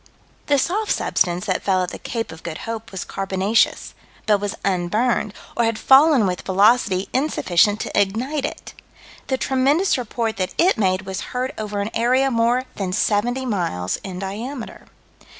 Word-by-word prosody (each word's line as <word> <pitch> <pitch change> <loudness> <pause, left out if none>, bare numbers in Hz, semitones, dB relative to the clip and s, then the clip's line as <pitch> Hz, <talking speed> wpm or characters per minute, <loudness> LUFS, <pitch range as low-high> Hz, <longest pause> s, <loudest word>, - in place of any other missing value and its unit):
The 285 - +3
soft 400 +10 0
substance 180 -1 0
that 185 - -1
fell 185 -2 +1
at 180 - -4
the - - -8
Cape 230 -1 -4
of 160 0 -11
Good 160 -2 -6
Hope 225 -1 -6
was 190 -2 -4
carbonaceous, 195 +3 0 0.3
but 210 -2 +3
was 205 -1 -3
unburned, 205 +4 0 0.2
or 240 - +2
had 225 -1 0
fallen 270 -2 +5
with 180 -1 -2
velocity 200 -1 +3
insufficient 210 - +2
to - - -5
ignite 250 +9 -1
it. - - -7 0.5
The 265 - 0
tremendous 275 +6 +2
report 230 -2 -3
that 185 -1 -3
it 370 +3 +4
made 190 -3 +1
was 190 +1 -5 0.2
heard 255 +2 -2
over 210 -1 -3
an 205 +2 -3
area 255 +4 +2
more 235 +2 +2
than 190 -2 -2
seventy 235 +6 0
miles 170 - -1
in 185 -2 -8
diameter. 220 +7 -6
215 Hz, 165 wpm, -21 LUFS, 190-255 Hz, 0.5 s, fallen